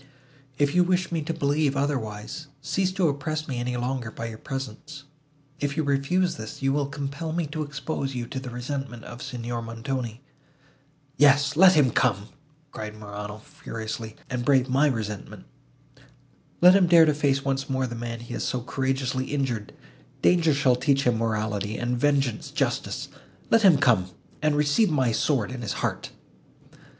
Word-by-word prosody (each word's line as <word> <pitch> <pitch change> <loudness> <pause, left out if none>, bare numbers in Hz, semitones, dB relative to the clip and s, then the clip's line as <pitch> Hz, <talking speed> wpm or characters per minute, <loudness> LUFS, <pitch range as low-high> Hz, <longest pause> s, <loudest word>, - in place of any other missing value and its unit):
If 145 0 +2
you 180 - +5
wish 180 0 0
me 165 -2 0
to 155 - -3
believe 145 -2 +1
otherwise, 135 0 -3
cease 190 +6 0
to 185 -3 +2
oppress 155 +2 -2
me 125 -3 -3
any 125 0 -2
longer 125 -1 -2
by 115 +1 -6
your 110 -1 -9
presence. 135 +3 -6 0.6
If 145 0 -2
you 160 - +2
refuse 145 +6 +1
this, 110 0 -7
you 135 0 +1
will 145 -1 0
compel 140 +3 -4
me 170 -1 0
to 155 +1 -4
expose 140 -2 -3
you 120 -1 -3
to 130 +3 -5
the 130 -1 -7
resentment 125 -1 -5
of 120 +1 -9
Signor 120 -3 -4
Montoni." 115 +1 -4 1.0
"Yes, 140 0 +5
let 185 +3 +8
him 145 -7 +4
come," 105 -4 +1 0.4
cried 110 0 -7
Morano 105 0 -7
furiously, 115 -7 -6
"and 125 -1 -3
brave 130 -1 +3
my 135 +4 +3
resentment! 105 -6 -4 1.2
Let 180 +1 +9
him 190 -2 +5
dare 170 -1 +7
to 155 - +3
face 140 -2 +1
once 135 0 -1
more 130 -1 0
the 120 - -5
man 115 0 -5
he 120 0 -8
has - - -3
so 125 - -1
courageously 130 0 -1
injured; 130 -8 -2 0.5
danger 165 -4 +4
shall 130 -3 +3
teach 140 +1 +2
him 120 -3 +2
morality, 110 -2 -1
and 120 0 -1
vengeance 135 -3 +1
justice—let 225 - -2
him 190 -7 +7
come, 115 -10 +3 0.3
and 155 -1 +2
receive 150 +8 +3
my 130 -6 +2
sword 115 -1 +1
in 130 -1 -6
his 110 -4 -2
heart!" - - -3
135 Hz, 165 wpm, -26 LUFS, 120-150 Hz, 1.2 s, Let